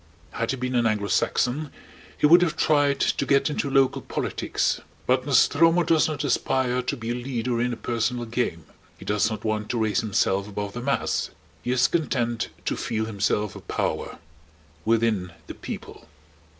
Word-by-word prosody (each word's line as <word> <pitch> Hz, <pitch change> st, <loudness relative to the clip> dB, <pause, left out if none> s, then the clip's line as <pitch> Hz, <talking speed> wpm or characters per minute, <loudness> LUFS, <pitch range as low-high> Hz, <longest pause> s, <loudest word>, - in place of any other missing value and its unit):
Had 115 Hz, 0 st, -3 dB
he 135 Hz, -, -1 dB
been 125 Hz, 0 st, -3 dB
an 120 Hz, -2 st, +3 dB
Anglo 105 Hz, -2 st, -1 dB
Saxon 140 Hz, +4 st, +1 dB, 0.5 s
he -, -, +2 dB
would 170 Hz, +4 st, +8 dB
have 175 Hz, -3 st, +1 dB
tried 145 Hz, -2 st, +3 dB
to -, -, +1 dB
get 140 Hz, +2 st, +2 dB
into 145 Hz, -1 st, -2 dB
local 135 Hz, -1 st, +3 dB
politics. -, -, -1 dB, 0.2 s
But 130 Hz, +1 st, +1 dB
Nostromo 165 Hz, +6 st, +4 dB
does 160 Hz, -2 st, +3 dB
not 155 Hz, -3 st, -3 dB
aspire 125 Hz, -1 st, +1 dB
to 125 Hz, -, -3 dB
be 115 Hz, 0 st, -4 dB
a -, -, 0 dB
leader 120 Hz, -1 st, -2 dB
in 125 Hz, +1 st, 0 dB
a -, -, -2 dB
personal 120 Hz, +1 st, -1 dB
game. 110 Hz, -9 st, -2 dB, 0.3 s
He -, -, -12 dB
does 105 Hz, +1 st, +1 dB
not 110 Hz, -1 st, -5 dB
want 110 Hz, -1 st, -1 dB
to 120 Hz, -, -1 dB
raise 110 Hz, 0 st, +1 dB
himself 100 Hz, -2 st, 0 dB
above 100 Hz, -1 st, -5 dB
the 120 Hz, -, -5 dB
mass. 140 Hz, +2 st, 0 dB, 0.3 s
He 120 Hz, -, -5 dB
is 125 Hz, 0 st, +4 dB
content 120 Hz, -8 st, -1 dB, 0.2 s
to -, -, 0 dB
feel 110 Hz, -1 st, -2 dB
himself 105 Hz, -1 st, -1 dB
a -, -, -7 dB
power -, -, -3 dB, 0.7 s
within 110 Hz, -6 st, +1 dB
the -, -, -7 dB
People. -, -, -8 dB
120 Hz, 175 wpm, -25 LUFS, 110-135 Hz, 0.7 s, would